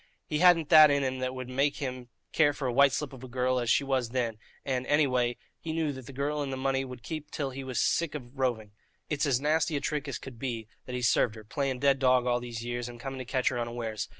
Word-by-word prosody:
He 150 - -2
hadn't 175 -3 +5
that 155 -2 +9
in 140 -1 +2
him 130 -1 -2
that 130 0 -2
would 130 -1 -6
make 135 +3 +1
him 130 -3 -5 0.2
care 145 -2 +4
for 140 - -5
a 125 - -1
white 140 +2 +6
slip 145 0 -3
of 130 -1 -11
a - - -7
girl 125 +1 0
as 120 -1 -2
she 140 - +4
was 130 -3 0
then, 115 -3 -2 0.3
and, 130 -2 -1
any 145 +1 +4
way, 125 -2 0 0.2
he 160 - -4
knew 160 -2 0
that 130 -2 -10
the - - -8
girl 145 +2 -2
and 140 -2 -3
the 130 - -3
money 135 0 0
would 125 -2 -9
keep 155 -2 -6
till 140 -3 -3
he 135 +1 -6
was 130 -2 -3
sick 165 -3 +1
of 135 -1 -9
roving. 115 -5 -1 0.4
It's 150 0 +1
as 130 -3 +2
nasty 155 +2 +1
a - - +1
trick 150 0 -2
as 140 - -3
could 130 -4 -11
be 115 -4 -4 0.2
that 125 - -4
he's 125 -1 +1
served 110 0 +2
her, 110 - -10
playing 135 +3 -2
dead 140 -1 +3
dog 130 -1 +4
all 120 -1 +2
these 120 -1 -6
years, 120 0 -3
and 120 -1 -10
coming 135 +1 -6
to 130 - -5
catch 130 +1 +1
her 125 - -3
unawares. 115 -2 -4
130 Hz, 270 wpm, -29 LUFS, 120-140 Hz, 0.4 s, that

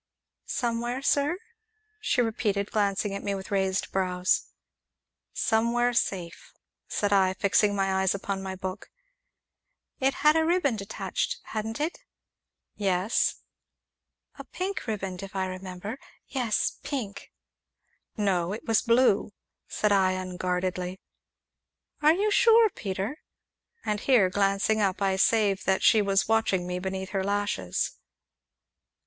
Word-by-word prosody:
"Somewhere, 240 +2 -2
sir?" 285 +4 +2 0.6
she 250 - +1
repeated, 210 -3 -1
glancing 200 -1 0
at 200 - -4
me 200 -1 -2
with 190 +1 -8
raised 190 -1 0
brows. 180 -1 +1 0.8
"Somewhere 235 +2 +1
safe," 185 -7 -2 0.3
said 205 -1 0
I, 190 -1 +3
fixing 205 +1 +2
my 195 -1 +1
eyes 190 0 +2
upon 195 0 -3
my 190 0 -5
book. 190 +1 -6 1.1
"It 270 +1 +2
had 300 +1 +7
a 320 - +3
riband 320 - +1
attached, 195 +2 -3
hadn't 220 +2 -4
it?" 315 +4 -2 0.8
"Yes." 195 +1 +1 1.0
"A - - -6
pink 375 -5 -4
riband, 195 -4 -3
if 195 0 -9
I 190 -1 0
remember 185 +5 -6 0.3
yes, 245 -6 -1
pink." 230 -8 -5 0.9
"No 190 -3 +1
it 215 - -7
was 225 -2 +3
blue!" 230 -4 +3 0.3
said 210 - 0
I 190 -2 +4
unguardedly. 185 0 -3 1.0
"Are 305 +1 +6
you 410 +4 +1
sure, 460 -1 +6
Peter?" 200 - -4 0.7
And 210 -1 0
here, 215 -7 +4
glancing 200 +2 +2
up, 195 -2 +1
I 195 -1 +1
save 200 0 +2
that 190 0 +1
she 220 - +6
was 195 -1 +2
watching 220 -5 +2
me 180 0 -3
beneath 190 +1 -4
her 195 -2 -1
lashes. 200 - -1
200 Hz, 125 wpm, -27 LUFS, 190-230 Hz, 1.1 s, had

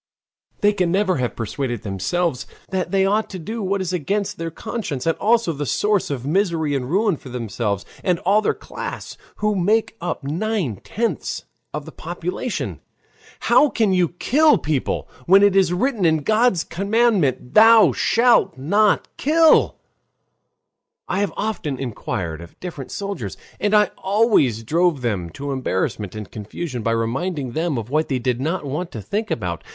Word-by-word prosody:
They 205 0 +4
can 180 -4 0
never 190 -2 +2
have 125 -2 -2
persuaded 120 +1 -3
themselves 125 - -1 0.2
that 185 -3 -1
they 195 +1 +2
ought 210 +3 +1
to 190 - -6
do 220 +7 -5
what 195 0 -1
is 185 -1 -3
against 200 +5 -2
their 165 0 -3
conscience, 160 - -5
and 165 - +2
also 225 -5 +2
the 145 -1 -4
source 210 +5 +1
of 135 -3 -4
misery 165 -2 +1
and 130 -2 -2
ruin 195 0 +2
for 135 - -12
themselves, 115 -4 -3 0.2
and 180 -3 +2
all 205 +3 +3
their - - 0
class, - - -7 0.2
who 210 0 0
make 210 +4 +1
up 175 -4 -3
nine 165 - -1
tenths 230 - -3 0.3
of - - -5
the - - -9
population. 365 - -4 0.6
"How 295 - +5
can 220 -6 +1
you 180 -3 +3
kill 295 - +3
people, 150 -5 -2 0.2
when 195 +3 +7
it 200 -1 +4
is 190 -3 +4
written 220 +3 0
in 160 -3 +3
God's 215 -3 +3
commandment: 195 - +1
'Thou 225 0 +7
shalt 230 - +3
not 200 +10 +2
kill'?" 320 +2 +4 1.3
I 190 - -1
have 205 -1 0
often 175 -11 -2
inquired 100 -9 -4
of 85 - -13
different 160 -7 -7
soldiers. 200 0 -5 0.2
And 205 +1 +2
I 210 -2 +4
always 190 - +2
drove 165 +3 +1
them 100 -8 -2
to 140 0 -5
embarrassment 105 -5 -2
and 105 -2 -7
confusion 120 +5 -5
by 115 - 0
reminding 130 +5 -2
them 160 +1 -1
of 115 +2 -5
what 155 +2 +1
they 135 - 0
did 125 0 -1
not 160 +2 -2
want 155 +6 -3
to 110 - -5
think 210 - -2
about. 90 - -3
175 Hz, 165 wpm, -21 LUFS, 130-205 Hz, 1.3 s, when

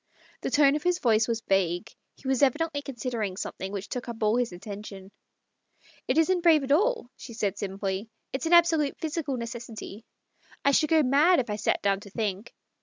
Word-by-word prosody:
The - - -2
tone 290 -1 +4
of 300 - -2
his 355 +2 +1
voice 225 -7 +2
was 230 -1 -1
vague: 190 +1 +1 0.2
he 270 - -11
was 265 -1 +1
evidently 285 +2 +1
considering 235 -7 -4
something 190 0 -5
which 200 0 -5
took 250 -1 -5
up 225 -1 -5
all 215 +1 +3
his 245 -3 0
attention. 195 +1 -9 0.5
" - - -31
It - - +1
isn't 355 +2 +3
brave 325 -4 +5
at 270 - -3
all," 410 - +2
she 235 - -10
said 205 -3 -1
simply. 195 +1 -4
" - - -52
It's 270 +5 -2
an 340 - +2
absolute 330 -4 +4
physical 305 -4 -2
necessity; 230 -2 -7 0.6
I 280 - +5
should 305 +2 +3
go 320 -2 +4
mad 295 +7 +4
if 240 -4 -2
I - - -1
sat 215 - 0
down 195 -1 +2
to 205 0 -12
think. 205 0 -3
240 Hz, 200 wpm, -27 LUFS, 205-295 Hz, 0.6 s, brave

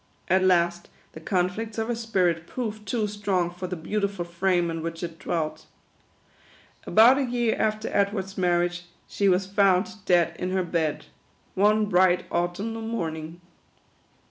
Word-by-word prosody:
At 185 +1 +3
last, 175 -1 +2 0.2
the - - -10
conflicts 185 +6 -2
of 225 0 -1
her 240 - 0
spirit 185 -8 0
proved 215 -4 -5
too 225 0 0
strong 200 -4 -1
for 180 +1 -6
the 180 - -4
beautiful 200 +2 -2
frame 175 0 0
in 165 0 -4
which 165 +1 -5
it 165 -1 -6
dwelt. 155 -2 -3 1.2
About 240 +5 +6
a - - +1
year 240 -2 0
after 215 0 0
Edward's 200 -1 0
marriage, 175 -1 0 0.2
she 200 -1 +1
was 185 +1 +2
found 195 +1 +1
dead 175 -2 +3
in 180 - -2
her 190 -1 +1
bed, 160 -3 -2 0.5
one 210 +2 +3
bright 180 -2 +3
autumnal 195 +6 -2
morning. 165 -7 -4
185 Hz, 145 wpm, -25 LUFS, 175-210 Hz, 1.2 s, About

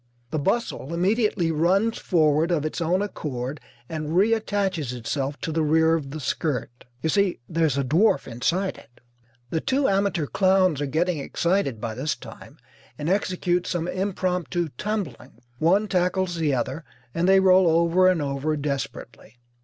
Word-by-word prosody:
The 155 - -1
bustle 170 - -1
immediately 190 -2 +1
runs 190 +8 +1
forward 155 -2 +2
of 160 -4 0
its 155 - -3
own 180 +4 +1
accord 140 -8 -5 0.3
and 155 -1 -4
reattaches 200 - +1
itself 135 +4 -3
to 160 - -3
the 160 +1 0
rear 160 +1 +3
of 155 -4 -1
the 155 +3 -6
skirt. 130 -4 -3 0.2
You 160 - +1
see, 200 +1 +1
there 165 -1 +1
is 140 -3 -1
a 140 - +1
dwarf 155 - +2
inside 170 +11 -1
it. 120 - -21 0.5
The 160 - 0
two 270 +1 +1
amateur 195 -5 +1
clowns 185 -3 +2
are 145 - -1
getting 165 +3 0
excited 170 - 0
by 110 +1 -4
this 135 +6 -2
time - - -12 0.4
and 150 +4 -2
execute 180 -2 0
some 175 -1 -2
impromptu 180 -3 -1
tumbling. 200 - -4 0.3
One 195 +7 +3
tackles 180 -1 0
the 160 -3 0
other 135 +5 -3 0.3
and 170 +2 +1
they 195 0 +6
roll 185 -1 +5
over 170 +3 +4
and 180 -5 +2
over 140 +2 -1
desperately. 135 -5 -5
165 Hz, 160 wpm, -24 LUFS, 150-190 Hz, 0.5 s, they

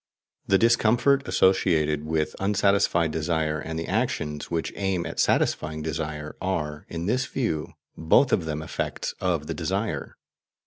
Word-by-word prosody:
The 95 - +5
discomfort 120 +5 +3
associated 80 -5 +2
with 80 -1 -1
unsatisfied 100 -4 +2
desire, 80 -1 -1
and 80 0 -5
the 80 - -4
actions 75 -1 -2
which 85 -1 -2
aim 95 -3 -1
at - - -5
satisfying 75 0 +1
desire, 75 -1 -4
are, 75 -5 -3
in 85 0 -4
this 125 +6 0
view, 80 - -2 0.2
both 80 - +3
of 85 - +2
them 80 -1 -3
effects - - -3
of 85 -5 0
the - - -3
desire. - - -3
80 Hz, 140 wpm, -25 LUFS, 75-95 Hz, 0.2 s, The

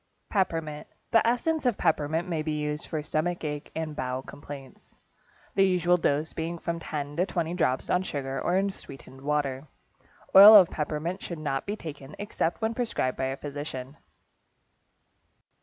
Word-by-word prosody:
=Peppermint.= 165 -6 -1 0.2
The 225 -1 +4
essence 305 +7 +1
of 245 -5 +1
peppermint 160 +2 +1
may 165 -3 -1
be 155 0 -2
used 150 0 -3
for 155 -2 -3
stomach 160 +4 -1
ache 150 -1 -4
and 160 -1 -3
bowel 130 0 -3
complaints, 140 -2 -11 0.6
the 195 - +2
usual 180 -2 +3
dose 155 -1 0
being 165 +1 -3
from 170 0 -3
10 145 -2 -5
to 180 - +3
20 170 -3 -2
drops 130 -7 0
on 180 - +2
sugar 135 -6 -4
or 180 - +1
in 195 +1 +1
sweetened 135 -6 -12
water. 140 -1 -1 0.7
Oil 205 +3 +11
of 190 -5 +8
peppermint 155 +4 -3
should 170 - -6
not 145 -1 -3
be 205 - -1
taken, 150 -6 -9
except 205 -1 -2
when 220 +1 +1
prescribed 225 - -1
by 130 - -2
a 135 +1 -2
physician. 145 -2 -6
155 Hz, 160 wpm, -27 LUFS, 145-180 Hz, 0.7 s, Oil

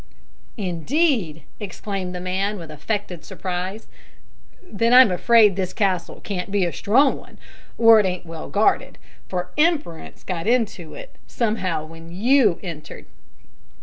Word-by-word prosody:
"Indeed!" 195 - 0 0.2
exclaimed 195 -2 -5
the - - -4
man, 190 +3 -2
with 165 -4 -9
affected 180 +2 -4
surprise, 185 +3 -5 0.8
"then 230 - +1
I'm 255 -5 +8
afraid 210 +1 +4
this 185 -1 -3
castle 185 -4 -1
can't 190 -2 -5
be 200 -2 +1
a 170 - -3
strong 265 +7 +3
one, - - -17 0.4
or 225 -1 +7
it 205 - +2
ain't 180 -1 -4
well 165 -1 -8
guarded, 210 +2 +1 0.3
for 180 -1 -4
`Imperence' 300 - -1
got 180 0 -4
into 225 -8 -1
it - - -11
somehow 185 -9 -2
when 165 +1 -12
you 220 0 +3
entered." 165 -5 -8
195 Hz, 135 wpm, -22 LUFS, 175-225 Hz, 0.8 s, I'm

